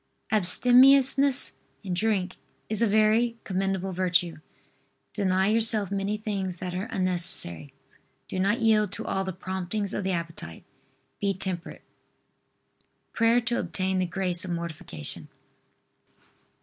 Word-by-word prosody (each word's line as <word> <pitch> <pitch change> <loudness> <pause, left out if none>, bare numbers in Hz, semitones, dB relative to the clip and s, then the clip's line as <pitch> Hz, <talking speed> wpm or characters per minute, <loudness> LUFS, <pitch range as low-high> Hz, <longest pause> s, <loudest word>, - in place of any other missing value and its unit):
Abstemiousness 260 +6 +4 0.3
in 185 -3 -4
drink 190 -1 -1 0.3
is 215 0 -3
a 230 - +4
very 220 +3 +2
commendable 195 0 -2
virtue. 175 -2 0 0.8
Deny 190 -1 +1
yourself 220 -3 +2
many 200 +1 -2
things 195 -4 -4
that 180 +1 -5
are 185 +5 -4
unnecessary. 175 - +2 0.6
Do 185 - -4
not 200 +4 +1
yield 215 -3 +3
to - - -6
all 195 0 -1
the 190 - -4
promptings 190 +2 -4
of 200 - -3
the 190 - -1
appetite. 165 - -6 0.6
Be 200 -1 0
temperate. 185 -2 -5 1.3
PRAYER 230 +1 +3
TO 235 +1 -2
OBTAIN 185 +2 -1
THE 185 - 0
GRACE 180 -1 -1
OF 185 - -6
MORTIFICATION. 170 - -4
190 Hz, 125 wpm, -26 LUFS, 180-215 Hz, 1.3 s, Abstemiousness